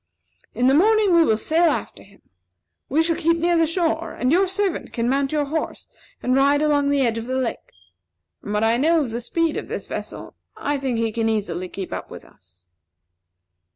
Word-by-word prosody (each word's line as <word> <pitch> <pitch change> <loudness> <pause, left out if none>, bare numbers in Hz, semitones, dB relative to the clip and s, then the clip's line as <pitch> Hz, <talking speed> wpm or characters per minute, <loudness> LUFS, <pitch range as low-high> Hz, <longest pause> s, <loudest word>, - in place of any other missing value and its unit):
In 245 - +1
the 265 - +5
morning 420 +4 +4
we 335 -1 +6
will 220 -8 +2
sail 330 +8 +2
after 295 - -4
him. 200 0 -20 0.7
We 310 +5 +2
shall 330 0 0
keep 335 +2 +1
near 345 +1 +1
the 330 -1 +3
shore, 330 0 -1
and 250 +2 -1
your 375 +4 +3
servant 385 -1 -2
can 235 0 -1
mount 275 +1 0
your 300 -1 0
horse 315 +3 -4 0.4
and 255 +1 +1
ride 280 +2 +4
along 290 -2 +2
the 285 -1 +2
edge 230 -1 0
of 225 - -7
the 260 - -2
lake. 255 -3 -3 0.7
From 205 - -6
what 210 +1 +1
I 225 +1 +3
know 320 +5 +3
of 245 - -5
the 235 +2 -4
speed 330 +6 -1
of - - -5
this - - -5
vessel, - - -7 0.2
I 285 0 -2
think 260 -3 -2
he 225 -1 0
can 225 0 -1
easily 185 -5 -2
keep 190 0 -6
up - - -6
with - - -11
us." 90 +1 -23
280 Hz, 210 wpm, -22 LUFS, 230-330 Hz, 0.7 s, we